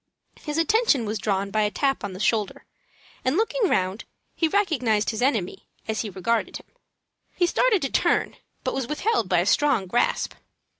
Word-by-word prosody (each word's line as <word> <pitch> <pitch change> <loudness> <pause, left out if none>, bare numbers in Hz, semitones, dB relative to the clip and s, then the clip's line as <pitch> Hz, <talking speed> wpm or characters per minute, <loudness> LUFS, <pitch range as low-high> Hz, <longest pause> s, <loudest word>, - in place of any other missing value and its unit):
His 300 0 -4
attention 330 - +3
was 215 0 -3
drawn 195 0 -1
by 215 - +1
a 210 - +2
tap 270 +6 -1
on 200 -2 -4
the 185 - -8
shoulder, 215 -1 0 0.6
and, 260 +6 +1
looking 450 -1 +1
round, 190 +3 0 0.3
he 330 - +1
recognized 260 - +1
his 220 - -5
enemy, 230 -9 -1 0.2
as 220 -1 -1
he 220 - -4
regarded 205 +5 -1
him. - - -16 0.7
He 355 - +2
started 420 - +2
to 275 - +1
run, - - 0 0.3
but - - -1
was 265 -3 -2
withheld 300 - 0
by 175 -2 +3
a - - -1
strong 265 -2 +2
grasp. 215 +7 0
235 Hz, 180 wpm, -24 LUFS, 205-320 Hz, 0.7 s, attention